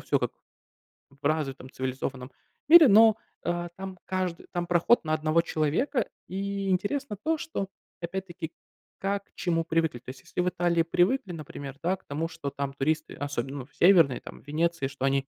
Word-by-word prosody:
всё - - +1
как - - -2 0.8
в 140 0 -25
развитом 140 -4 -1
цивилизованном 130 0 -4 0.4
мире, 325 -1 +10
но, 220 0 +7 0.3
э, 175 0 -2
там 190 -1 -7
кажд 185 -3 -2
там 175 -1 -1
проход 175 +7 +4
на 155 - 0
1 155 +1 +2
человека, 165 - 0 0.2
и 195 +1 -3
интересно 210 +4 -1
то, 320 0 +1
что, 310 - -4 0.3
опять-таки, 175 -1 -5 0.5
как 200 +1 -1
к - - -37
чему 165 -2 0
привыкли. 160 -6 0
То 125 - -12
есть 130 0 -9
если - - -3
в 180 - +2
Италии 175 -1 +1
привыкли, 185 +5 +1
например, 140 -3 -7
да, 185 +3 +2
к 190 - -30
тому, 155 +3 -2
что 165 -4 -5
там 140 0 -3
туристы, 155 +3 -1
особенно, 140 -1 -3
ну, 125 - -6
в - - -29
северной 165 -9 +6
там, - - -11
в - - -28
Венеции, 165 0 0
что 135 0 -4
они 135 0 +1
170 Hz, 180 wpm, -28 LUFS, 145-190 Hz, 0.8 s, мире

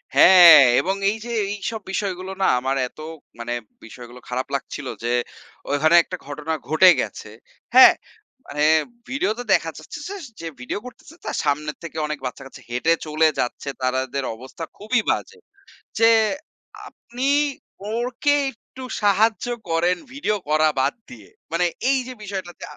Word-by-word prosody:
হ্যাঁ, 175 -4 +9 0.2
এবং 190 +2 -1
এই 215 - -2
যে, 240 - -6 0.2
এইসব 210 +2 -4
বিষয়গুলো 190 -1 -3
না - - +4
আমার 135 +2 -1
এত 125 - -20 0.4
মানে 120 +1 -4 0.3
বিষয়গুলো 120 +2 -12
খারাপ 125 +1 -3
লাগছিলো 135 0 -5
যে, 120 - 0 0.6
ওখানে 155 +3 +3
একটা 180 - -7
ঘটনা 150 +2 -4
ঘটে 160 +4 +6
গেছে। - - -7 0.5
হ্যাঁ? - - +10 0.5
মানে 150 +1 -3 0.5
ভিডিওতে 245 -3 -1
দেখা 165 - +1
যাচ্ছে - - -9 0.4
যে, 165 - -5
ভিডিও 125 +10 -4
করতেছে 250 +5 -13
তার - - -3
সামনে 150 +1 0
থেকে 165 -2 -8
অনেক 150 -1 -4
বাচ্চা-কাচ্চা 135 +1 -8
হেঁটে 125 +8 +1
চলে 155 +1 +2
যাচ্ছে, 125 +3 -3
তাদের 130 +1 -1
অবস্থা 130 +7 -10
খুবই 220 +3 0
বাজে। - - -4 0.6
যে, 225 0 +6 0.8
আপনি 250 +3 -4 0.7
ওকে 250 +5 0 0.2
একটু 260 +2 -14 0.2
সাহায্য 210 +3 +2 0.2
করেন 175 +2 +1 0.2
ভিডিও 240 -6 -1
করা 155 +1 +3
বাদ 135 +2 +1 0.2
দিয়ে 110 -5 -13 0.2
মানে 170 +2 +1 0.2
এই 275 - +3
যে, 255 - -6
বিষয়টাতে 190 -4 -7
165 Hz, 140 wpm, -22 LUFS, 140-210 Hz, 0.8 s, হ্যাঁ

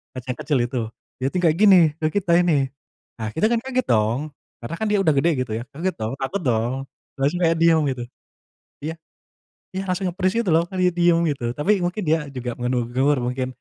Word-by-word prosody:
kaca 130 -1 -7
yang 125 - -8
kecil 145 -1 +1
itu. 120 +1 -2 0.4
Dia 130 - 0
itu 160 - -2
kayak 160 -2 +4
gini, 205 -2 +7 0.2
ke 155 - +1
kita 180 +1 -1
ini. 145 -7 +2 0.5
Nah 110 - -3
kita 160 - +2
kan 235 - +2
kayak 260 +2 -8
gitu - - -2
dong. 110 +2 +2 0.4
Karena 140 +8 -4
kan 220 - 0
dia 210 - +3
udah 160 - +4
gede 140 +5 +3
gitu 120 - -10
ya. - - -5
Kaget 180 +5 -2
dong, 110 +2 -2
takut 180 +9 -2
dong. 120 -1 +1 0.5
Terus 140 +2 +2
kayak 165 0 +3
diam 165 -1 +4
gitu. 125 -2 -4 0.8
Iya. 160 +2 -3 0.8
Iya, 190 - -2
langsung 185 +1 -1
nge-freeze 185 +2 -1
gitu 215 - -2
loh, 165 +1 +3 0.3
diem 175 -1 +4
gitu. 140 -3 -3
Tapi 150 +8 +2
mungkin 180 +4 -2
dia 160 - +4 0.2
juga 125 -1 -3
menegur 125 +3 +1
mungkin, 125 +1 -2
150 Hz, 205 wpm, -22 LUFS, 125-175 Hz, 0.8 s, gini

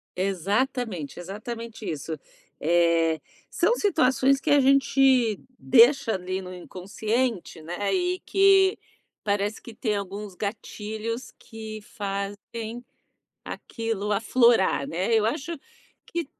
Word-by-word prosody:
Exatamente, 195 - -1
exatamente 215 +3 -6
isso. 155 0 -4 0.4
Eh, 165 -1 +3 0.3
são 475 - +2
situações 275 - +3
que 275 - -3
a 290 - +6
gente 265 -4 +4 0.2
deixa 260 0 +5
ali 185 0 -3
no 185 0 -8
inconsciente, 205 +2 -3
né, 175 +5 -2
e 365 0 0
que 390 0 +5 0.5
parece 205 +1 -1
que 235 - -11
tem 215 -2 -1
alguns 200 0 -5
gatilhos 220 +3 -5
que 220 -1 -9
fazem 205 +3 -5 0.6
aquilo 220 -3 -3
aflorar, 225 - +3
né, 185 +7 0
eu 220 -1 +3
acho 300 +7 -3 0.5
que 340 -2 -3
220 Hz, 105 wpm, -26 LUFS, 195-255 Hz, 0.6 s, a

